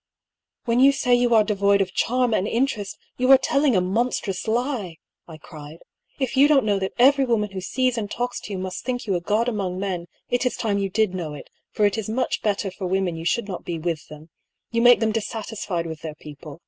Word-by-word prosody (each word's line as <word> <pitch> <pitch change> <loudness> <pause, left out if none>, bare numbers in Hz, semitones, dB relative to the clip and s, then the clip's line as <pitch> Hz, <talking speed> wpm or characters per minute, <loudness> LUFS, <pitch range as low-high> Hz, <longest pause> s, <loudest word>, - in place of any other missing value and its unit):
" - - -61
When 235 +1 +1
you 270 +2 +7
say 265 -3 +1
you 245 -1 +3
are 220 - +6
devoid 200 -1 +2
of 190 -2 -1
charm 250 -1 +1
and 205 -1 +1
interest 230 -5 -1 0.2
you 255 +1 +1
are 270 - +10
telling 275 0 +1
a 185 - +3
monstrous 195 0 -1
lie," 225 - -2 0.3
I 160 -2 -10
cried. 155 -1 -11 0.3
" - - -38
If - - -7
you 275 +2 +6
don't 285 -5 +4
know 205 -2 +1
that 190 0 -3
every 270 +3 +5
woman 220 -5 0
who 190 -1 -5
sees 255 +4 0
and 205 -2 -4
talks 245 +2 -3
to - - -10
you 195 - -3
must 185 0 -5
think 245 -1 -3
you 200 - -1
a 175 - -1
god 215 +6 0
among 195 -6 -2
men, 185 -3 -3 0.2
it 245 - +1
is 250 - 0
time 205 -3 0
you 195 -1 -1
did 215 -1 +1
know 165 -5 -4
it; 145 - -12 0.2
for 210 - +1
it 205 +2 +1
is 215 - -5
much 250 +4 -1
better 200 -2 -1
for 185 0 -5
women 185 -2 0
you 165 0 -7
should 235 +4 0
not 185 -4 -6
be 170 - -4
with 165 -1 -3
them. 155 +1 -13 0.4
You 230 0 +1
make 240 -2 +6
them 220 -1 +2
dissatisfied 215 -5 -3
with 160 -2 -7
their 155 -2 -6
people. 150 0 -11
205 Hz, 240 wpm, -23 LUFS, 180-245 Hz, 0.4 s, are